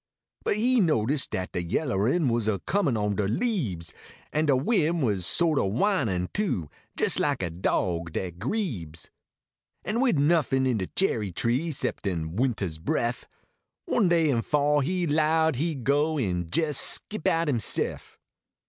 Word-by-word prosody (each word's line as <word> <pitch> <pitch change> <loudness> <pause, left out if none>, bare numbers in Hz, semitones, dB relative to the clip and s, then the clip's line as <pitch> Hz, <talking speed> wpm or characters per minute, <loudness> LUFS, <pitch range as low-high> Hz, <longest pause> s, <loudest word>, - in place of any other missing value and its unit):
But - - 0
he 245 +3 +3
notice 145 - +1
dat 90 0 -4
de 90 - -2
yellerin 125 - 0
Was 115 -2 0
a 105 -2 +1
coinin 170 - +1
on 105 -1 0
de 100 - +1
leahes, 110 - -2 0.4
An 155 +1 +1
de 140 - +4
win 165 - +1
was 100 -8 0
so 170 - +3
t 145 - +2
o 95 - 0
whinin, 110 - 0
too, 100 - -1 0.3
Jes - - +1
like - - 0
a 85 - -2
dog 85 -1 -1
dat 90 -2 -4
grebes, 110 - -4 0.7
An 225 +3 0
wid 255 - +3
nuffin 140 -3 +2
in 125 -4 +1
de 95 - -3
cherry 110 - 0
tree 125 - 0
Kxceptin 90 - -2
wintah 115 -1 0
s 80 -3 -5
bref, 120 +9 -2 0.6
One 230 - +2
day 165 -3 +3
in 115 -3 +1
fall 145 +2 +2
he 175 +5 0
lowed 160 -1 +2
he 160 +3 -1
d 135 - -7
go 145 +4 +2
En 90 - -1
jes 150 -4 +1
skip 215 -6 -1
out 165 0 +2
himself. 120 -7 -1
135 Hz, 165 wpm, -26 LUFS, 100-165 Hz, 0.7 s, de